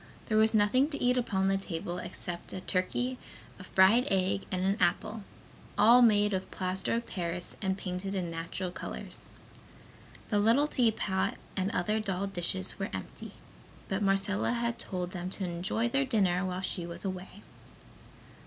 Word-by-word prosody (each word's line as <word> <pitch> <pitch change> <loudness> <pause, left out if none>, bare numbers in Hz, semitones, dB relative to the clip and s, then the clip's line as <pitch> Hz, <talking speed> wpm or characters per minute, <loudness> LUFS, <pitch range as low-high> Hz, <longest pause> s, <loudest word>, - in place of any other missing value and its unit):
There 215 - +3
was 220 +1 +5
nothing 235 +7 +4
to 290 - -3
eat 250 0 +3
upon 195 -6 +1
the 195 0 +3
table 175 -2 -4
except 175 -1 -5
a 185 - -4
turkey, 245 +8 -1 0.4
a - - -8
fried 195 +8 +5
egg 190 0 +1
and 185 -1 -1
an 195 +2 +2
apple, 215 -1 0 0.5
all 235 +4 +7
made 210 -3 +5
of 190 0 -2
plaster 185 +3 -1
of 235 0 -2
paris 175 -1 -4
and 190 -1 0
painted 190 +1 -4
in 175 -3 -2
natural 170 +2 -4
colors. - - -7 1.0
The 205 - +3
little 230 +8 +4
teapot 220 -8 +1 0.2
and 190 0 0
other 210 +2 0
doll 195 -2 -2
dishes 185 0 -2
were 195 - -2
empty, 95 -1 -7 0.6
but 190 +2 -1
Marcella 200 +3 +1
had 235 0 -1
told 180 -1 -3
them 180 0 -4
to 190 0 -3
enjoy 180 +7 -1
their 275 +3 +1
dinner 195 -7 +2
while 185 0 -2
she 185 -1 -2
was 170 +2 -7
away. 190 +2 -6
195 Hz, 165 wpm, -30 LUFS, 185-220 Hz, 1.0 s, all